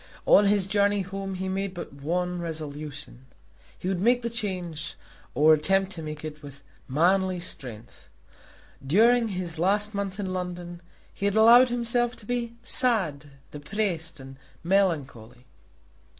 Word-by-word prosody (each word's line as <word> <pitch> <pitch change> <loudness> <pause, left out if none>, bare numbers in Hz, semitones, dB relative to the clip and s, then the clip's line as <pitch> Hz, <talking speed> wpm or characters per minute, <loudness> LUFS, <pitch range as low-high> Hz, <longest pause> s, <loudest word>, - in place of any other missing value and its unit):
On 205 - +6
his 200 -2 +3
journey 205 0 +2
home 195 0 -5
he 190 +1 -4
made 190 0 -3
but 175 - -7
one 175 +5 -2
resolution. 150 -4 -7 0.5
He - - -6
would 190 -2 -1
make 245 +3 +3
the 235 - -2
change, 185 -9 -4 0.4
or 155 +2 +6
attempt 195 +5 +1
to 170 - -7
make 155 0 -6
it, 150 -1 -8
with 140 -1 -12 0.2
manly 185 +6 +2
strength. 115 - -10 0.7
During 230 - +4
his 180 -5 -5
last 205 +4 +1
month 200 -1 -3
in 190 -2 -3
London 175 -1 -5 0.3
he 200 - -4
had 200 - 0
allowed 235 +3 +7
himself 240 0 0
to 215 - -14
be 235 0 -3
sad, 190 - +2 0.3
depressed, 165 0 -3
and 135 0 -11 0.3
melancholy. 145 - -1
185 Hz, 140 wpm, -26 LUFS, 155-205 Hz, 0.7 s, allowed